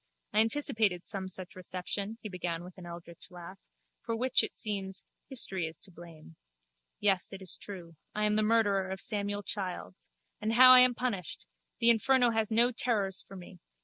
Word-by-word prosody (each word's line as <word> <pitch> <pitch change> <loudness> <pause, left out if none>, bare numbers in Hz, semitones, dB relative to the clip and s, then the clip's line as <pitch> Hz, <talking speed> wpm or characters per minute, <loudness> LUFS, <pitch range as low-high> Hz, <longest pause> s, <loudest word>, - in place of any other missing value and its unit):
I 215 - +3
anticipated 220 -6 +2
some 190 -1 -4
such 185 -1 -5
reception, 185 +4 -5
he - - -4
began 175 -3 -4
with 180 0 -12
an 175 - -10
eldritch 170 +1 -11
laugh, 180 +1 -11 0.4
for 230 - -3
which, 255 +2 +2
it - - -5
seems, 195 -3 -3 0.2
history 190 - +2
is 160 0 -8
to 195 - -10
blame. 165 - -14 0.6
Yes, 195 -3 +2
it 195 - -8
is 185 -2 -1
true. 175 -5 -11 0.2
I 210 - 0
am 210 - +2
the 215 - +2
murderer 210 -3 +1
of 190 0 -5
Samuel 205 -1 -2
Childs. 185 - -5 0.3
And 220 +1 -1
how 255 +2 +9
I 255 - +9
am 250 -1 +5
punished! 220 -10 -4 0.3
The 235 0 +7
inferno 245 +1 +3
has 220 -1 -1
no 235 +2 +3
terrors 210 -6 0
for 195 - -14
me. 180 0 -12
200 Hz, 180 wpm, -30 LUFS, 180-225 Hz, 0.6 s, how